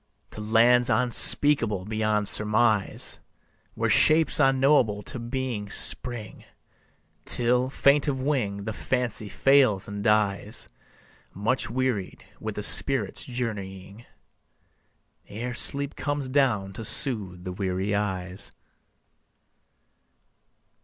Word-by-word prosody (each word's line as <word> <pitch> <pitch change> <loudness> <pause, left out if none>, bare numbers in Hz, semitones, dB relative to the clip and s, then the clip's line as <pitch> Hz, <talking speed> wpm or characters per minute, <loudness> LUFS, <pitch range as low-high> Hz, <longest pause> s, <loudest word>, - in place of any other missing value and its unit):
To 110 - -9
lands 120 +3 +2
unspeakable 120 -4 +5
beyond 110 -1 -2
surmise, 105 -1 0 0.6
Where - - -2
shapes 160 +1 +3
unknowable 135 -6 +1
to 125 - -8
being 120 -3 -5
spring, 110 0 +1 0.8
Till, 125 +1 0
faint 140 +2 +1
of 135 -2 -2
wing, 120 -8 -3
the 110 - -6
Fancy 120 -4 -4
fails 130 -8 +1
and 100 0 -7
dies 105 -1 -1 0.7
Much 110 +7 -2
wearied 120 -6 -4
with - - -7
the - - -6
spirit's - - +4
journeying, 105 -3 -7 1.2
Ere 120 +4 -7
sleep 140 +3 +1
comes 145 -2 -4
down 120 -8 -1
to 110 - -9
soothe 100 -7 -1
the 90 - -7
weary 95 +1 -4
eyes. 95 -2 -5
110 Hz, 100 wpm, -24 LUFS, 100-130 Hz, 1.2 s, unspeakable